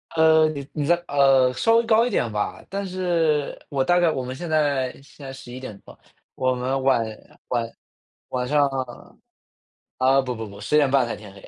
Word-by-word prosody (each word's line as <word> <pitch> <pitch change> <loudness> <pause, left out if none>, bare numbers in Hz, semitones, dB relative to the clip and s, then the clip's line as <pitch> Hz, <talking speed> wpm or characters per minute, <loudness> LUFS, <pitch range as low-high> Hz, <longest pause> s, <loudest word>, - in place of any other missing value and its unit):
呃， 160 -1 +5
你 140 -3 -6
你 150 -2 -2
在 175 - +4
呃， 135 -2 +4
稍 225 - +2
微 230 0 +3
高 225 +1 +4
一 - - -1
点 115 - 0
吧。 105 0 -3
但 200 +1 -3
是 170 -5 0
我 135 -2 0
大 175 +5 +3
概 175 -1 +3
我 130 -4 -2
们 130 +1 -6
现 170 +4 -6
在 145 -5 +1
现 140 +1 -14
在 135 - -6
11:00 125 -4 -9
吧， - - -16 0.4
我 130 -1 +1
们 130 +2 -2
晚 130 -4 +2 0.4
晚 115 -2 -1 0.6
晚 125 -1 -2
上 145 +1 +3
啊 130 -3 -6 0.8
啊， 135 +1 +4
不 125 -1 -4
不 110 0 -6
不， 100 0 -12
10:30 140 +1 +3
才 120 - -4
天 105 -2 -12
黑。 100 - -15
135 Hz, 195 characters per minute, -23 LUFS, 125-155 Hz, 0.8 s, 呃